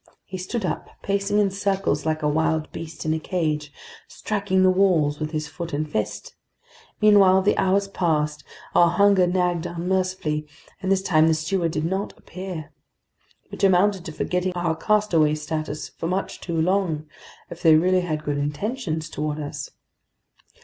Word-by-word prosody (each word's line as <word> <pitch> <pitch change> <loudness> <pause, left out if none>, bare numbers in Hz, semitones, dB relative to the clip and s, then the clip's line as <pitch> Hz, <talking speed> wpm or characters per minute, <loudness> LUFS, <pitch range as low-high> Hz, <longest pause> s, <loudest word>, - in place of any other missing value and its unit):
He 185 0 -7
stood 195 +3 -3
up, - - -3
pacing 200 +1 0
in 205 -2 +3
circles 195 -6 -1
like 155 0 -1
a - - +2
wild 160 +1 0
beast 165 0 -7
in 155 - +1
a 160 - -1
cage, 155 -4 -2 0.4
striking 200 -3 0
the 185 - +6
walls 175 -6 +2
with 155 -1 -2
his 155 -1 -3
foot 170 +2 -7
and 155 +2 -1
fist. 110 -8 -3 0.7
Meanwhile 195 -3 +6
the 205 - +3
hours 195 +1 +2
passed, 150 -6 -1 0.3
our 170 -1 +6
hunger 195 0 +4
nagged 175 -1 0
unmercifully, 175 -3 -1 0.3
and 190 -1 -1
this 190 -1 +2
time 160 -4 +4
the 160 - +3
steward 165 +1 -1
did 155 +1 -1
not 190 +4 -3
appear. 180 -4 -7 0.8
Which - - -8
amounted 190 0 +4
to - - -5
forgetting 180 +4 -1
our 175 -2 -1
castaway 165 -5 +2
status 155 -1 -4
for 165 - -5
much 185 +3 -3
too 170 -2 -2
long, 170 -3 +1 0.5
if - - -9
they 160 -1 +6
really 180 +3 +3
had 155 -3 -3
good 145 -1 -1
intentions 160 - -3
toward 150 -1 -3
us. 145 -1 -5
170 Hz, 165 wpm, -24 LUFS, 155-190 Hz, 0.8 s, the